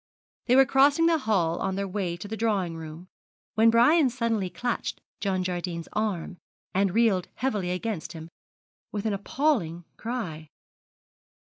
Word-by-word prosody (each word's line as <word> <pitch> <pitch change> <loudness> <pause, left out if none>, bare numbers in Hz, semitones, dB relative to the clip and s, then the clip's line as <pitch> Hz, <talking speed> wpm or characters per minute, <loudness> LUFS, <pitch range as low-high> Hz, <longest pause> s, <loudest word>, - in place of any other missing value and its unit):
They 250 - +5
were 270 0 +7
crossing 280 +5 +4
the 330 -1 +4
hall 185 - +1
on 190 0 -1
their 200 0 -2
way 185 -3 -2
to 205 - -8
the 220 - -4
drawing 205 -7 0
room, 160 +2 -9 0.5
when 225 +1 +5
Brian 260 +6 +5
suddenly 230 -6 -1
clutched 245 +5 -3 0.2
John 190 -2 0
Jardine's 175 -2 -3
arm 195 -5 -2 0.4
and 195 0 +1
reeled 215 -6 +3
heavily 210 -9 -1
against 180 0 -3
him, 160 -1 -8 0.6
with 205 0 -4
an 215 - +1
appalling 200 - 0
cry. 180 -11 -5
200 Hz, 145 wpm, -27 LUFS, 175-230 Hz, 0.6 s, were